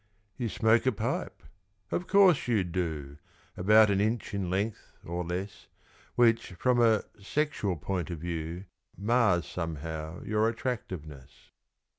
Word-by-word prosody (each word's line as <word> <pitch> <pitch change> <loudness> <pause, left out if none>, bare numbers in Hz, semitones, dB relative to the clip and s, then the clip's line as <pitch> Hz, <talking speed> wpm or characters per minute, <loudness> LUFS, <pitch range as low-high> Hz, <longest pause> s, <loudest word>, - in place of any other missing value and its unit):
You 120 -3 -2
smoke 115 +3 +3
a - - +5
pipe 105 - -3 0.5
of 180 - -2
course, 190 -8 +5
you 110 -5 +2
do! 80 -6 -3 0.4
About 105 +3 +5
an 100 0 +2
inch 110 +1 -1
in 100 -3 -2
length 100 +4 -2
or 85 +1 -3
less, 95 +2 -5 0.5
Which, 115 -5 +3
from 120 +6 +2
a 110 -3 +4 0.2
sexual 110 -5 -1
point 90 +2 -3
of 85 - -4
view, 85 +2 -5 0.3
Mars 105 -4 +2
somehow 80 -1 -5
your 110 +1 +2
attractiveness. 90 - -6
100 Hz, 130 wpm, -29 LUFS, 85-115 Hz, 0.5 s, a